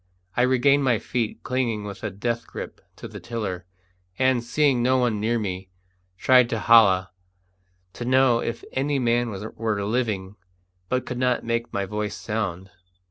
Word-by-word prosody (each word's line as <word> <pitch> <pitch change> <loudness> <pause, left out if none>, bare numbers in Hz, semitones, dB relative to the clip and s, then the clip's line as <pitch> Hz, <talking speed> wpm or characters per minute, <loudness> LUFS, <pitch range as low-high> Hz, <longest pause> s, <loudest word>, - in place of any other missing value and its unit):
I - - +2
regained 130 +3 +4
my 125 -4 +3
feet, 115 0 -3
clinging 120 -5 -1
with 100 -1 -7
a 110 - -1
death 115 +4 -3
grip - - -8
to - - -8
the - - -9
tiller, 100 -6 -5 0.5
and, 130 -2 +2
seeing 135 0 +2
no 130 +2 +3
one 120 -4 +1
near 115 +3 +1
me, 95 -3 -4 0.5
tried 125 +3 +5
to 115 - -1
holloa, 100 -5 +5 0.8
to - - -6
know 130 -1 +4
if 115 0 -4
any 140 +2 0
man 120 -1 +1
were 105 0 -3
living, 105 -4 -2 0.5
but 130 0 0
could 125 -1 -5
not 125 -1 +1
make 115 0 -2
my 100 0 -1
voice 105 +1 -3
sound. 100 -4 -4
115 Hz, 160 wpm, -24 LUFS, 105-125 Hz, 0.8 s, tried